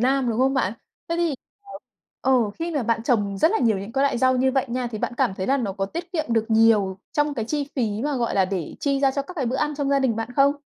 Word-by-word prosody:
Nam, 260 0 +2
đúng 225 - -2
không 270 +1 +3
bạn? 205 -7 +1 0.4
Thế 335 - -1
thì 340 -4 +1 0.9
ờ, 265 - +2
ừ, 235 -5 +3
khi 335 +1 -2
mà 265 - +1
bạn 225 0 0
trồng 205 -6 0
rất 320 - +4
là 445 - +2
nhiều 220 -5 +2
những 200 +4 -7
cái 270 - +1
loại 260 -4 +1
rau 260 0 +3
như 260 +1 +2
vậy 265 0 +2
nha, 250 +1 -2
thì 215 - -4
bạn 240 - -3
cảm 190 - +1
thấy 190 - -4
là 275 - +3
nó 220 -7 -2
có 195 0 -2
tiết 340 - -7
kiệm 315 -3 0
được 225 -1 +2
nhiều 220 -4 +4
trong 295 -1 +1
cái 225 - -2
chi 290 +4 -2
phí 220 -3 -1
mà, 295 -2 0
gọi 235 -2 -1
là, 195 - +4
để 185 -4 -4
chi 275 -1 0
ra 275 -1 +4
cho 280 +1 -2
các 365 +6 -11
cái 270 -7 -2
bữa 255 +3 -1
ăn 300 +1 -1
trong 285 -1 -2
gia 280 - +4
đình 255 -5 +1
bạn 225 +1 -3
không? 280 +1 +5
255 Hz, 300 wpm, -23 LUFS, 220-280 Hz, 0.9 s, không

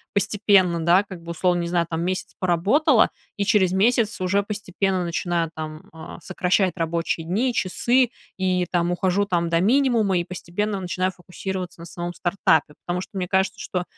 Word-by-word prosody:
постепенно, 195 -5 +3
да, 175 +4 +5
как-бы, 175 -4 -10
условно, 175 +1 +1
не 170 - -3
знаю 170 -1 +1
там, 165 0 -2
месяц 185 +2 -3
поработала 215 - +3 0.3
и 200 - 0
через 190 -3 +3
месяц 220 +3 +2
уже 190 +2 +1
постепенно 195 -2 -2
начинаю 170 -1 -1
там, 155 0 -7
а, 160 0 -9
сокращать 185 0 +1
рабочие 165 -1 -2
дни, 235 +8 0
часы, 240 +5 +2 0.3
и 185 -1 +1
там 175 -1 +1
ухожу 185 +3 +1
там 170 -3 0
до 165 0 +2
минимума 230 -4 +3
и 175 - 0
постепенно 190 +3 -3
начинаю 185 +1 -1
фокусироваться 180 -1 -6
на - - -8
самом 175 +1 -5
стартапе. 160 -5 +1
Потому 180 +1 -2
что, - - -10
мне 180 - -2
кажется, 190 +1 0
что 180 -1 -3
185 Hz, 165 wpm, -23 LUFS, 175-200 Hz, 0.3 s, да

